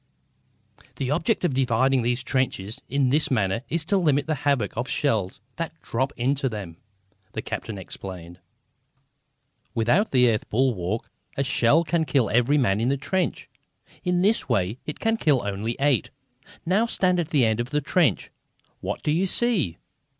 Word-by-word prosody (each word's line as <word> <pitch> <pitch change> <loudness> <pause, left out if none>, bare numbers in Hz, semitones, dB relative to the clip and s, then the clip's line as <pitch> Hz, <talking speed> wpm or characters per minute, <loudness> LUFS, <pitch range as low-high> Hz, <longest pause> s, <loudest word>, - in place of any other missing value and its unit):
"The 135 0 -2
object 180 +6 +1
of 160 - +1
dividing 130 0 +2
these 120 +1 -1
trenches 125 -6 -2
in 135 -1 +2
this 150 +4 +2
manner 105 -3 +1
is 165 -2 0
to 200 +4 +2
limit 145 -6 +2
the 160 - 0
havoc 140 -8 0
of 120 +4 -3
shells 110 -11 0 0.2
that 165 -1 -5
drop 130 +4 -1
into 135 +2 0
them," 100 -7 -7 0.6
the - - -3
captain 110 - -5
explained. 90 -2 -8 1.4
"Without 120 - +2
the 125 -2 +4
earth 110 - -3
bulwark 110 -4 0 0.3
a 140 - +2
shell 135 +4 +3
can 160 0 0
kill 130 -8 +1
every 125 +6 +3
man 105 -7 +2
in 120 - +1
the 140 - +1
trench. 185 +6 -2 0.6
In 180 -1 +1
this 215 +3 +2
way 100 +6 0
it 150 - -5
can 225 0 +1
kill 145 - +2
only 105 +3 -3
eight. 140 -3 +2 0.6
Now 200 +7 +2
stand 180 -5 +1
at 170 - -1
this 150 -6 +2
end 110 0 +2
of 120 +1 -2
the 150 - +1
trench. 150 - +1 0.5
What - - -4
do 150 - +1
you 175 +5 +1
see?" 195 - +1
135 Hz, 165 wpm, -25 LUFS, 115-155 Hz, 1.4 s, the